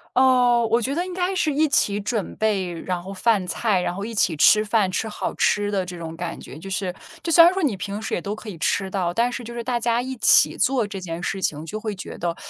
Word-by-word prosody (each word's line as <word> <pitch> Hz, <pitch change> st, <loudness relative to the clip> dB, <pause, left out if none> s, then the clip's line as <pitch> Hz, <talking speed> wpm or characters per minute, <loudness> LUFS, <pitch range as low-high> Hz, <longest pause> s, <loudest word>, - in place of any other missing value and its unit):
呃， 250 Hz, -2 st, +4 dB
我 230 Hz, +2 st, +2 dB
觉 260 Hz, +4 st, -2 dB
得 340 Hz, +4 st, -1 dB
应 370 Hz, -, -7 dB
该 365 Hz, +1 st, -1 dB
是 330 Hz, -4 st, +1 dB
一 305 Hz, +2 st, +2 dB
起 205 Hz, -7 st, +1 dB
准 210 Hz, 0 st, -3 dB
备 200 Hz, -5 st, 0 dB
然 175 Hz, +1 st, -4 dB
后 190 Hz, +2 st, -8 dB
饭 195 Hz, -1 st, +1 dB
菜， 205 Hz, -2 st, 0 dB
然 175 Hz, -, -2 dB
后 200 Hz, +2 st, -4 dB
一 230 Hz, -, -6 dB
起 185 Hz, -6 st, +1 dB
吃 215 Hz, +8 st, +6 dB
饭、 210 Hz, -3 st, +1 dB
吃 220 Hz, +4 st, -2 dB
好 -, -, -4 dB
吃 205 Hz, 0 st, +1 dB
的 195 Hz, -2 st, 0 dB
这 180 Hz, -1 st, -8 dB
种 165 Hz, -1 st, -7 dB
感 170 Hz, 0 st, -5 dB
觉。 -, -, -11 dB
就 195 Hz, -, -9 dB
是 190 Hz, -1 st, -2 dB, 0.3 s
就 335 Hz, -, -2 dB
虽 335 Hz, -, +9 dB
然 345 Hz, -, +7 dB
说 380 Hz, -1 st, -2 dB
你 265 Hz, -9 st, +1 dB
平 200 Hz, +2 st, -5 dB
时 220 Hz, -, -5 dB
也 -, -, -1 dB
都 205 Hz, +3 st, -4 dB
可 215 Hz, -, -12 dB
以 205 Hz, -, -6 dB
吃 190 Hz, +3 st, 0 dB
到， 185 Hz, -3 st, -1 dB
但 235 Hz, +7 st, +1 dB
是 245 Hz, -, -5 dB
就 235 Hz, +1 st, -8 dB
是 235 Hz, -, -4 dB
大 240 Hz, 0 st, -1 dB
家 235 Hz, +1 st, 0 dB
一 260 Hz, +1 st, -5 dB
起 225 Hz, -, +5 dB
做 255 Hz, -3 st, +1 dB
这 200 Hz, -1 st, -6 dB
件 170 Hz, -2 st, -6 dB
事 195 Hz, +1 st, -3 dB
情， 155 Hz, -3 st, -2 dB
就 215 Hz, +6 st, -5 dB
会 215 Hz, -2 st, -4 dB
觉 190 Hz, -, -8 dB
得 170 Hz, -1 st, -2 dB
210 Hz, 295 characters per minute, -23 LUFS, 185-240 Hz, 0.3 s, 虽